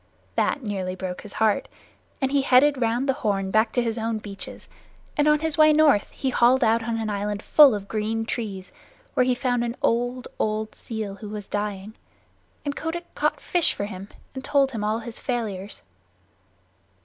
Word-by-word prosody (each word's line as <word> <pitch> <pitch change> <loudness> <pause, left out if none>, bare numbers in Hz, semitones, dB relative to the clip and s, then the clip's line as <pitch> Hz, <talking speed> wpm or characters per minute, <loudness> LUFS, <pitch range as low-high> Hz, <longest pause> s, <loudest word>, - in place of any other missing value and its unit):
That 285 - 0
nearly 190 -4 -3
broke 185 -1 -5
his 205 - -11
heart, 220 -2 +1 0.5
and 265 -1 0
he 280 -1 +3
headed 270 +1 +4
round 235 +4 +1
the 270 - +3
Horn 195 -3 0
back 220 +2 +3
to 245 - +2
his 230 0 -2
own 225 0 -1
beaches; 200 -2 -8 0.5
and 295 0 +2
on 300 0 +4
his 320 0 -1
way 310 0 +8
north 300 -8 +4
he 265 - -3
hauled 250 +2 +4
out 225 0 +3
on 230 0 -2
an 220 -1 -2
island 205 0 -3
full 290 -7 +7
of 200 -1 -6
green 220 +1 -2
trees, 200 -5 -4 0.4
where 255 - +3
he 250 - +3
found 245 -1 0
an 235 0 -3
old, 245 +2 0
old 215 0 -1
seal 220 -3 -5
who 210 +1 -8
was 210 -1 -6
dying, 205 0 -3 0.7
and 285 -1 -2
Kotick 340 +2 -5
caught - - 0
fish 350 -3 +1
for 200 - -2
him 195 -1 -7 0.3
and 265 - -6
told 275 -1 +2
him 220 -4 -4
all 215 +1 +1
his 230 0 -8
sorrows. 210 -6 -4
225 Hz, 185 wpm, -24 LUFS, 210-260 Hz, 0.7 s, way